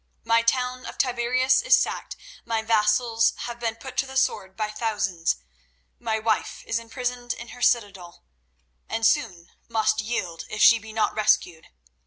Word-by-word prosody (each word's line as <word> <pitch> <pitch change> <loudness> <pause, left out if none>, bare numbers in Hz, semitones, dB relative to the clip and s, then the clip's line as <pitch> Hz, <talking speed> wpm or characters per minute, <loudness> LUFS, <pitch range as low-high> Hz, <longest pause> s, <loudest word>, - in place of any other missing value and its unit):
My 230 0 +3
town 250 +2 0
of - - -8
Tiberias 255 - +2
is - - +5
sacked; - - -2 0.3
my 225 -1 -2
vassals 225 +1 +2
have 240 0 -6
been 230 -1 -2
put 255 +2 -10
to 270 - +1
the 265 0 -5
sword 190 -7 0
by 215 -1 -2
thousands; 210 -6 -1 0.6
my 220 - -1
wife 220 0 -1
is 230 - -1
imprisoned 245 +1 -4
in 235 0 -10
her 245 - -11
citadel, 200 -8 0 0.7
and 225 - -1
soon 210 - +1 0.2
must 220 -1 +1
yield, 185 -7 -4
if 215 - -5
she 230 - +8
be 220 0 -11
not 220 0 0
rescued. 180 -6 +1
225 Hz, 160 wpm, -25 LUFS, 215-245 Hz, 0.7 s, she